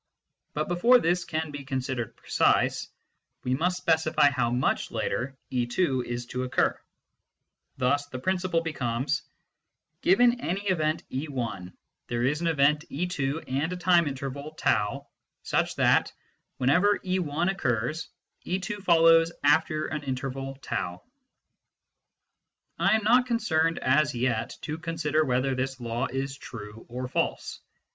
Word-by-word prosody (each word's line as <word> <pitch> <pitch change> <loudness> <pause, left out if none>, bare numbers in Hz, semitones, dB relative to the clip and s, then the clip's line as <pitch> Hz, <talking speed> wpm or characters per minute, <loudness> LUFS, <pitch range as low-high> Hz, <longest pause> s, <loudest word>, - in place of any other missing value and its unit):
"] - - -54
But 150 +1 -1
before 230 +9 +5
this 175 -5 +1
can 160 -1 -3
be 145 -1 -7
considered 130 -3 -3
precise, - - +1 0.6
we 125 - 0
must 180 +7 +1
specify 160 -4 +3
how 125 -4 0
much 125 +2 0
later 130 +2 -2
e 125 -2 0
t 120 +10 0 0.2
is 120 0 -4
to 125 - -2
occur. 130 0 0 1.0
Thus 140 +2 +1
the 130 - -6
principle 180 +3 0
be 165 -1 -4
comes: 125 +1 -1 0.4
( - - -54
Given 240 +5 +4
any 190 0 -2
event 160 -2 0
e 135 +4 -3
lt 115 -9 -4 0.4
there 120 0 -1
is 145 +5 +1
an 170 - 0
event 150 -1 +3
2 150 -2 -2
and 140 +6 -1
a 180 - -3
time 175 -2 +4
interval 140 +2 -5
T - - +2 0.7
such - - 0
that, - - +3 0.5
whenever 175 +11 +3
e 185 0 +1
l 155 -2 -2
occurs, 150 - -1 0.3
d 180 - -1
2 195 +2 -5
follows 165 -2 +5
after 155 +1 +3
an 150 - -3
interval 135 0 -4
r. - - -18 0.4
J - - -24 1.8
I - - +4
am 220 - 0
not 245 +4 +4
concerned 165 -9 +1
as 140 +2 +2
yet 120 -2 -1
to 155 +1 -4
consider 160 -2 0
whether 130 0 +1
this 130 +1 -3
law 120 0 -2
is 135 +1 -3
true 115 -5 -10
or 125 +2 -4
false. 130 - -2
145 Hz, 150 wpm, -27 LUFS, 130-170 Hz, 1.8 s, before